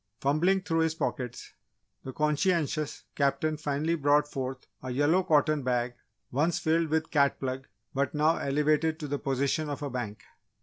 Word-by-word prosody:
Fumbling 175 Hz, +7 st, +2 dB
through 165 Hz, -4 st, 0 dB
his 160 Hz, -1 st, +1 dB
pockets, 125 Hz, -6 st, -4 dB, 0.5 s
the 130 Hz, -, -6 dB
conscientious 150 Hz, 0 st, 0 dB
Captain 150 Hz, +2 st, +1 dB
finally 150 Hz, +2 st, -1 dB
brought 145 Hz, -1 st, +3 dB
forth 130 Hz, -2 st, -5 dB, 0.2 s
a 130 Hz, -, -6 dB
yellow 145 Hz, +8 st, +3 dB
cotton 155 Hz, -4 st, +3 dB
bag 125 Hz, -1 st, 0 dB, 0.4 s
once 155 Hz, +6 st, +1 dB
filled 165 Hz, +1 st, +1 dB
with 160 Hz, +1 st, -1 dB
"cut 140 Hz, -2 st, +3 dB
plug" 130 Hz, 0 st, -4 dB, 0.3 s
but 140 Hz, +1 st, -1 dB
now 155 Hz, +2 st, +3 dB
elevated 150 Hz, +3 st, +1 dB
to 150 Hz, -, -4 dB
the 145 Hz, 0 st, -2 dB
position 140 Hz, +3 st, 0 dB
of 145 Hz, 0 st, -4 dB
a 140 Hz, -, -3 dB
bank. 115 Hz, -4 st, -5 dB
150 Hz, 160 wpm, -29 LUFS, 135-160 Hz, 0.5 s, brought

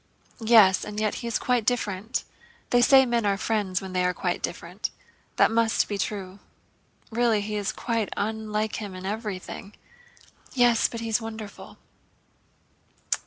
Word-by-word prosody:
"Yes, 220 Hz, -5 st, +6 dB
and 210 Hz, 0 st, -5 dB
yet 215 Hz, -1 st, +1 dB
he 235 Hz, -, -4 dB
is 230 Hz, -, 0 dB
quite 250 Hz, -2 st, +1 dB
different. 220 Hz, -2 st, -1 dB, 0.5 s
They 245 Hz, -, +5 dB
say 265 Hz, +2 st, +7 dB
men 235 Hz, -2 st, +1 dB
are 200 Hz, -1 st, +1 dB
friends 200 Hz, -4 st, -1 dB
when 190 Hz, -1 st, -7 dB
they 180 Hz, 0 st, +1 dB
are 180 Hz, 0 st, +1 dB
quite -, -, -2 dB
different. -, -, -4 dB, 0.5 s
That -, -, +4 dB
must 225 Hz, 0 st, +2 dB
be 205 Hz, -1 st, -3 dB
true. 195 Hz, -1 st, -4 dB, 0.7 s
Really 230 Hz, -2 st, +2 dB
he 210 Hz, +1 st, -4 dB
is 205 Hz, -1 st, -1 dB
quite 230 Hz, -4 st, -2 dB
unlike 215 Hz, 0 st, -2 dB
him—in 190 Hz, -3 st, -6 dB
everything." 205 Hz, -1 st, -5 dB, 0.8 s
"Yes, 240 Hz, -2 st, +4 dB
but 230 Hz, -, -6 dB
he's 230 Hz, 0 st, 0 dB
wonderful." 220 Hz, -2 st, -8 dB
215 Hz, 145 wpm, -26 LUFS, 200-230 Hz, 0.8 s, say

